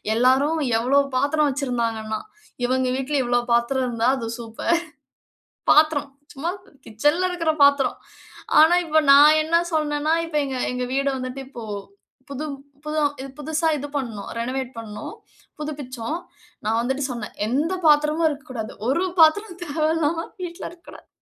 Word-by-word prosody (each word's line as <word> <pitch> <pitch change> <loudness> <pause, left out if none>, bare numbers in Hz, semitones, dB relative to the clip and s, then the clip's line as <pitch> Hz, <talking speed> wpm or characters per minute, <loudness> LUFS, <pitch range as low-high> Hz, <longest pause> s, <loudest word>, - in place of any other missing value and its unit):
எல்லாரும் 265 +7 +3 0.2
எவ்வளோ 260 +5 +3 0.2
பாத்திரம் 290 +3 +2
வச்சுருந்தாங்கன்னா, 230 -5 -2 0.5
"இவங்க 255 +1 +1
வீட்ல 270 +2 -1
இவ்வளோ 240 0 +1
பாத்திரம் 255 +3 +2
இருந்தா, 235 0 +1
அது 230 -3 -4
சூப்பர். 235 +9 -1 0.9
பாத்திரம், 300 -2 +4 0.2
சும்மா 315 +5 -2 0.4
கிட்சன்ல 295 - +1
இருக்கிற 335 -3 0
பாத்திரம். 280 -1 +4 0.6
ஆனா 320 +3 +7
இப்ப 315 -1 +3
நான் 300 +2 +7
என்ன 320 +2 0 0.2
சொன்னேன்னா 305 0 +1
இப்ப 330 -2 -8
எங்க 265 -2 -4 0.2
எங்க 250 0 -2
வீடு 275 +1 +1
வந்துட்டு, 255 +1 -5
இப்போ 240 -4 -9 0.7
புது 280 +2 -4 0.4
புது 305 0 -1
ம் 275 -2 -4
புதுசா 315 +2 -1
இது 290 +1 -5
பண்ணோம். 230 -8 -4
ரெனவேட் 255 +2 -2
பண்ணோம். 220 - -7 0.5
புதுப்பிச்சோம். 285 -2 -4 0.5
நான் 220 +2 +1
வந்துட்டு 265 +4 -1
சொன்னேன், 235 -3 -6
"எந்த 295 +10 0
பாத்திரமும் 300 +2 +4
இருக்கக்கூடாது. 260 -6 -6
ஒரு 275 +8 +2 0.2
பாத்திரம் 355 +4 +4
தேவையில்லாம 320 +1 0 0.2
வீட்ல 345 -1 -6
இருக்கக்கூடாது." 345 0 -15
280 Hz, 135 wpm, -23 LUFS, 250-310 Hz, 0.9 s, ஆனா